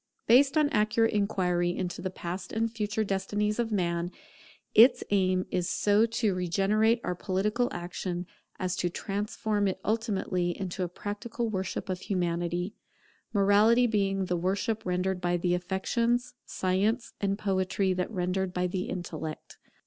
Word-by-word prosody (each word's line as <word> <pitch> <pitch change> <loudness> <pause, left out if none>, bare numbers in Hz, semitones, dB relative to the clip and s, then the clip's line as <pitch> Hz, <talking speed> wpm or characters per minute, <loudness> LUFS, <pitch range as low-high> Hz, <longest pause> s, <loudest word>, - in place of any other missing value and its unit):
Based 270 +6 +5
on 305 -1 +5
accurate 225 -3 +2
inquiry 180 -4 +1
into 180 -2 -3
the 185 - -2
past 180 0 -6
and 225 0 0
future 220 -1 -1
destinies 205 +2 -1
of 230 -1 0
man, 170 -3 0 0.6
its 240 +4 +7
aim 185 -2 +2
is 180 -1 0
so 210 +2 +3
to 225 -3 0
regenerate 195 +6 +2
our 180 - -1
political 210 +7 0
action, 175 0 -4 0.3
as 185 -1 -1
to 175 - 0
transform 205 +2 -1
it 190 0 -2
ultimately 195 -5 0
into 190 -1 -4
a 180 - -1
practical 215 +5 -4
worship 190 -2 -3
of 185 -1 -2
Humanity; 175 0 -1 0.6
Morality 210 +4 +5
being 195 -4 +1
the 180 -1 -1
worship 195 +5 -1
rendered 180 +1 0
by 175 0 +1
the 175 0 0
affections, 230 +7 0
Science 200 +6 0
and 200 -1 0
Poetry 190 -1 0
that 180 0 -2
rendered 185 -2 -2
by 180 0 +1
the 180 +1 -2
intellect. 160 -3 -6
195 Hz, 145 wpm, -29 LUFS, 180-215 Hz, 0.6 s, its